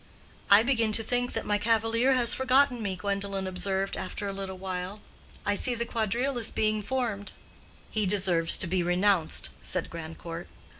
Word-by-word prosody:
"I 200 +2 +7
begin 230 -3 +1
to 225 - +2
think 245 +1 -1
that - - -2
my 205 0 0
cavalier 230 +4 +2
has 240 -2 +6
forgotten 265 -1 +3
me," 195 -3 -2
Gwendolen 200 0 -3
observed 190 +1 -2
after 190 +2 -5
a 195 - -4
little 195 -1 -6
while. 185 +2 -5 0.5
"I 205 - +2
see 245 +4 +2
the 235 0 -2
quadrille 235 +4 -1
is 225 - +2
being 215 0 0
formed." 220 -4 -3 0.6
"He 215 -2 0
deserves 185 -4 +3
to - - +2
be 180 +1 0
renounced," 180 -1 +1
said 180 - -2
Grandcourt. 165 +1 -8
205 Hz, 165 wpm, -27 LUFS, 185-230 Hz, 0.6 s, I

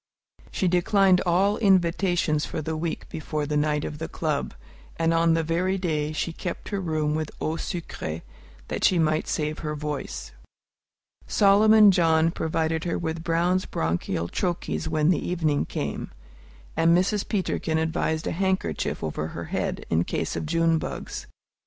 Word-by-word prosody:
She 185 - 0
declined 185 +1 +4
all 195 +4 +3
invitations 175 -5 +2
for - - -3
the 160 +1 -3
week 160 +1 -3
before 155 -1 -3
the 150 +1 -2
night 150 0 +1
of 150 - -6
the 160 - -3
club, 150 - -2 0.4
and 165 0 +2
on 165 0 +4
the 165 - +1
very 180 +4 0
day 155 -5 -1
she 160 +2 -2
kept 175 +1 -5
her 200 -2 -2
room 155 -3 0
with 155 0 -2
eau 155 - -1
sucrée, 160 - -5 0.4
that - - -4
she 185 - +4
might 155 -1 +1
save 150 0 -2
her 150 -2 -3
voice. 150 -1 -5 1.0
Solomon 210 +1 +6
John 165 -2 +3
provided 160 0 -1
her 170 - -1
with 160 -1 -3
Brown's 175 +2 +1
Bronchial 85 +1 -1
Troches 175 - -2
when 155 0 +2
the 170 - +2
evening 160 -5 0
came, - - -4 0.7
and 165 +1 +4
Mrs. 195 +3 0
Peterkin 180 -5 0
advised 160 0 -1
a - - -1
handkerchief 185 - -1
over 75 0 -2
her 85 +1 -6
head, - - -2
in 80 +1 +3
case - - -2
of 155 - -3
June 165 0 +2
bugs. - - -6
165 Hz, 160 wpm, -25 LUFS, 155-180 Hz, 1.0 s, Solomon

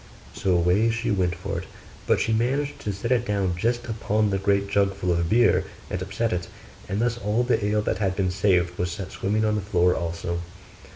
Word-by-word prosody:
So 95 - 0
away 90 +6 +3
she 115 0 -1
went 90 -3 +1
for 100 +3 -4
it: - - -8 0.4
but - - +3
she 110 - +1
managed 140 +5 0
to 105 - -3
set 100 +5 -4
it 120 -2 +3
down 100 -5 0
just 120 +6 0
upon 110 -2 0
the 95 - 0
great 100 0 +1
jug 100 -1 +1
full 90 -2 -1
of 85 -1 0
beer, 120 +3 +4 0.3
and 90 - -2
upset 100 +4 -1
it; 90 -1 -2 0.4
and 100 +2 -1
thus 120 +1 0
all 110 +2 +1
the 120 -3 +1
ale 105 +1 +1
that 90 - -1
had 95 -3 0
been 95 -2 0
saved 90 -2 +1
was 90 - 0
set 95 +1 -6
swimming 110 +3 0
on 105 - +2
the 105 - 0
floor 90 -2 +2
also. 85 0 -3
100 Hz, 220 wpm, -25 LUFS, 90-110 Hz, 0.4 s, beer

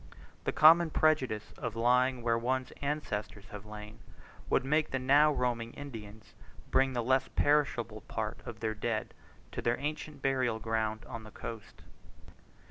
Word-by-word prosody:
The - - +1
common 165 +2 +7
prejudice 135 -9 +1
of 115 - -4
lying 125 +2 +2
where 115 -1 +2
one's 130 +2 -1
ancestors 110 -8 -3
have 105 0 -9
lain, 105 +1 -9 0.5
would - - +2
make 155 +3 +2
the 130 - -1
now 140 +4 +5
roaming 120 -4 -1
Indians 110 -7 -9 0.4
bring 135 0 +3
the 120 -1 -1
less 130 +2 +2
perishable 125 -7 +1
part 110 0 -3
of 115 -2 -8
their 110 -1 0
dead 110 0 -2 0.4
to - - -4
their 120 0 +1
ancient 150 0 -5
burial 130 -4 +1
ground 110 -1 -2
on 115 - -7
the 110 - -11
coast. 110 0 -9
120 Hz, 150 wpm, -31 LUFS, 110-135 Hz, 0.5 s, common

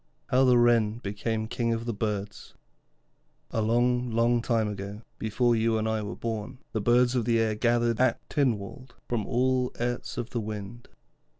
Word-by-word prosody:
HOW 130 +1 +4
THE 125 -1 +5
WREN 115 -2 +3
BECAME 110 0 -3
KING 115 0 -1
OF 115 +1 -5
THE 120 - -2
BIRDS 105 -1 -4 1.0
A 110 - 0
long, 120 +2 +2
long 115 +1 +2
time 115 -2 +1
ago, 100 +1 -6 0.2
before 120 +2 +1
you 115 0 +2
and 110 0 -1
I 110 -1 0
were 105 0 -5
born, 115 +2 -4
the 110 - -2
birds 120 +3 +4
of 120 -4 0
the 115 -1 +2
air 110 -1 +2
gathered 120 +1 +1
at 130 - +1
Tynwald 125 -1 -2
from 115 -4 -2
all 125 +1 +1
airts 120 +1 -3
of 120 -1 -4
the 120 - -2
wind. 105 +2 -7
115 Hz, 175 wpm, -27 LUFS, 110-120 Hz, 1.0 s, THE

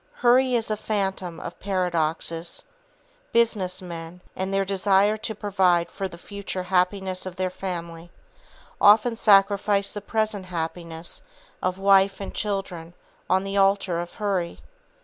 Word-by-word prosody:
Hurry 250 +1 +4
is 225 -2 0
a 215 - 0
phantom 195 -5 -2
of - - -8
paradoxes. 170 -3 -1 0.7
Business 205 -6 +2
men, 170 0 -8
in 190 +1 -2
their 195 0 +1
desire 195 +2 +3
to 220 0 -5
provide 185 -4 +1
for 195 -1 -3
the 170 -2 -11
future 195 0 -6
happiness 185 +1 0
of 180 - -7
their 185 -1 -1
family, 170 -3 -6 0.7
often 220 +3 +6
sacrifice 200 -1 +3
the 205 - -5
present 215 -2 -1
happiness 165 -1 -5 0.4
of 185 0 -1
wife 195 0 +4
and 195 - -6
children 185 -5 -4 0.3
on 190 +1 +3
the 195 0 -3
altar 195 -3 +2
of 175 0 -6
Hurry. 195 -5 -2
190 Hz, 135 wpm, -25 LUFS, 180-205 Hz, 0.7 s, often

